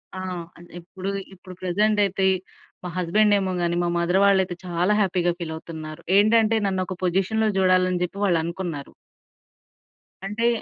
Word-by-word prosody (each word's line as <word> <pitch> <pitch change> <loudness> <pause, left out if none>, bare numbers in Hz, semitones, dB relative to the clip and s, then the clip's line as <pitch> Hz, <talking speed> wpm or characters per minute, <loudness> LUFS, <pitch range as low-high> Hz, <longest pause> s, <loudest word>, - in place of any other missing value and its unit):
ఆ! - - -5 0.4
అంటే 175 +1 -15
ఇప్పుడు, 185 +3 -7 0.2
ఇప్పుడు 185 0 -12
ప్రెజెంట్ 210 +4 +1
అయితే 190 0 -1 0.6
మా 180 - -4
హస్బండ్ 205 +4 +3
ఏమో 190 -1 -2
గాని, 170 0 0
మా - - 0
మదర్ 175 +2 +2
వాళ్ళయితే 190 -2 +3
చాలా 180 +3 +1
హ్యాపీగా 180 -2 +1
ఫీల్ 165 -2 -4
అవుతున్నారు. 160 0 -8 0.2
ఏంటంటే 220 +2 +4
నన్ను 190 -1 -1
ఒక 185 -1 -6
పొజిషన్‌లో 195 +5 +1
చూడాలని 185 -1 +3
చెప్పి 180 +2 -4
వాళ్ళనుకున్నారు. 170 -4 -2 1.3
అంటే 220 +4 0
185 Hz, 140 wpm, -24 LUFS, 175-200 Hz, 1.3 s, ఏంటంటే